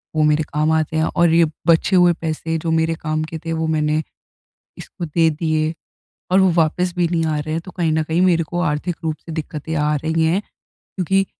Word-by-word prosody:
वो 155 Hz, -, +3 dB
मेरे 150 Hz, +1 st, +3 dB
काम 155 Hz, +1 st, +1 dB
आते 160 Hz, 0 st, 0 dB
हैं 160 Hz, -, +2 dB
और 170 Hz, -1 st, +4 dB
ये, 170 Hz, 0 st, +5 dB, 0.2 s
बचे 170 Hz, +3 st, +4 dB
हुए 175 Hz, -1 st, +5 dB
पैसे 160 Hz, 0 st, -2 dB
जो 160 Hz, +1 st, -2 dB
मेरे 160 Hz, 0 st, +1 dB
काम 155 Hz, 0 st, -1 dB
के 160 Hz, +1 st, -6 dB
थे 165 Hz, -, -2 dB
वो 160 Hz, 0 st, -1 dB
मैंने, 155 Hz, -1 st, +1 dB, 0.8 s
इसको 175 Hz, -, -7 dB
दे 165 Hz, +1 st, +2 dB
दिए 155 Hz, 0 st, -1 dB, 0.6 s
और 190 Hz, -, +5 dB
वो 190 Hz, -1 st, +5 dB
वापस 175 Hz, +2 st, +1 dB
भी 175 Hz, -1 st, +2 dB
नहीं 165 Hz, -1 st, 0 dB
आ 155 Hz, -1 st, 0 dB
रहे 155 Hz, +1 st, -4 dB
हैं, 165 Hz, -, -1 dB
तो 185 Hz, -, -11 dB
कहीं 170 Hz, -3 st, 0 dB
ना 155 Hz, 0 st, +1 dB
कहीं 160 Hz, +3 st, 0 dB
मेरे 175 Hz, -3 st, +3 dB
को 175 Hz, +3 st, -4 dB
आर्थिक 160 Hz, +2 st, -1 dB
रूप 160 Hz, -1 st, -1 dB
से 165 Hz, -, -8 dB
दिक्कतें 160 Hz, 0 st, -5 dB
आ 150 Hz, 0 st, +1 dB
रही 160 Hz, +2 st, 0 dB
हैं, 175 Hz, +5 st, +1 dB, 0.4 s
क्योंकि 195 Hz, +1 st, -1 dB
160 Hz, 220 wpm, -20 LUFS, 155-170 Hz, 0.8 s, ये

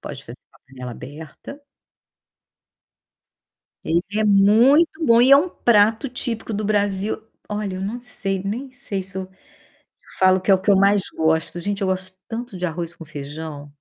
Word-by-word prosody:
pode -, -, -8 dB
fazer -, -, -11 dB
com -, -, -24 dB
a -, -, -34 dB
panela 125 Hz, -2 st, -9 dB
aberta. 155 Hz, -, -10 dB, 2.2 s
Ele 170 Hz, +1 st, +1 dB, 0.2 s
é 215 Hz, -, +2 dB
muito 240 Hz, +12 st, +4 dB
bom 230 Hz, -2 st, +5 dB
e 255 Hz, +2 st, +5 dB
é 275 Hz, -, +10 dB
um 335 Hz, +6 st, +2 dB
prato 220 Hz, -1 st, +2 dB
típico 230 Hz, -3 st, -3 dB
do 210 Hz, +1 st, -2 dB
Brasil 205 Hz, 0 st, 0 dB, 0.3 s
Olha, 205 Hz, -2 st, -3 dB
eu -, -, -5 dB
não 225 Hz, +5 st, -4 dB
sei 195 Hz, -5 st, -4 dB
nem 240 Hz, +7 st, -4 dB
sei 200 Hz, -6 st, -5 dB
se 190 Hz, +1 st, -11 dB
eu 190 Hz, 0 st, -4 dB, 0.9 s
falo 185 Hz, 0 st, +5 dB
que 195 Hz, -, +2 dB
é -, -, +8 dB
o 190 Hz, -, +2 dB
que 205 Hz, -, -1 dB
eu 200 Hz, -, +6 dB
mais 200 Hz, +1 st, +4 dB
gosto. 160 Hz, +2 st, 0 dB
Gente, 200 Hz, +3 st, -3 dB
eu 190 Hz, -, 0 dB
gosto 185 Hz, 0 st, -3 dB
tanto 235 Hz, -2 st, -6 dB
de 180 Hz, 0 st, -2 dB
arroz 170 Hz, 0 st, -5 dB
com -, -, -11 dB
feijão. 145 Hz, 0 st, -8 dB
195 Hz, 180 wpm, -21 LUFS, 175-225 Hz, 2.2 s, é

